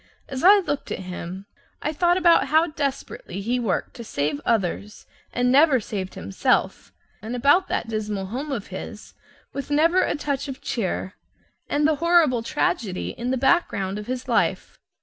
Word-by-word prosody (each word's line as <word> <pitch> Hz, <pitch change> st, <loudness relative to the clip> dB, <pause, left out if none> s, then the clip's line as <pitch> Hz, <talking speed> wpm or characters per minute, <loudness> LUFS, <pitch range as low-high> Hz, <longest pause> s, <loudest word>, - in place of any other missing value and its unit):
As 265 Hz, -1 st, -5 dB
I 400 Hz, +3 st, +8 dB
looked 320 Hz, -8 st, -3 dB
at -, -, -2 dB
him, 185 Hz, +1 st, -7 dB, 0.3 s
I 305 Hz, -, -2 dB
thought 350 Hz, +3 st, +2 dB
about 340 Hz, -4 st, +4 dB
how 315 Hz, +4 st, +4 dB
desperately 280 Hz, -, -4 dB
he 240 Hz, +5 st, -1 dB
worked 230 Hz, -5 st, -1 dB
to 235 Hz, -, -7 dB
save 145 Hz, -7 st, -2 dB
others, 210 Hz, -1 st, -1 dB, 0.3 s
and 245 Hz, 0 st, +1 dB
never 280 Hz, -1 st, +5 dB
saved 195 Hz, -3 st, -5 dB
himself, 95 Hz, +3 st, 0 dB, 0.3 s
and 225 Hz, +4 st, -5 dB
about 290 Hz, +9 st, +4 dB
that -, -, -2 dB
dismal 210 Hz, -3 st, -3 dB
home 265 Hz, +9 st, -5 dB
of 230 Hz, -7 st, -4 dB
his, -, -, -8 dB, 0.4 s
with 280 Hz, -, -5 dB
never 330 Hz, +5 st, +3 dB
a -, -, 0 dB
touch 285 Hz, -1 st, -2 dB
of 270 Hz, -1 st, -6 dB
cheer, 190 Hz, -6 st, -3 dB, 0.6 s
and 295 Hz, +1 st, +2 dB
the 310 Hz, -2 st, +1 dB
horrible 330 Hz, -7 st, +3 dB
tragedy 215 Hz, -4 st, -1 dB
in 240 Hz, +1 st, -4 dB
the 260 Hz, -, +1 dB
background 210 Hz, -, +1 dB
of 210 Hz, -, -8 dB
his 255 Hz, 0 st, -4 dB
life. -, -, 0 dB
255 Hz, 170 wpm, -24 LUFS, 205-300 Hz, 0.6 s, I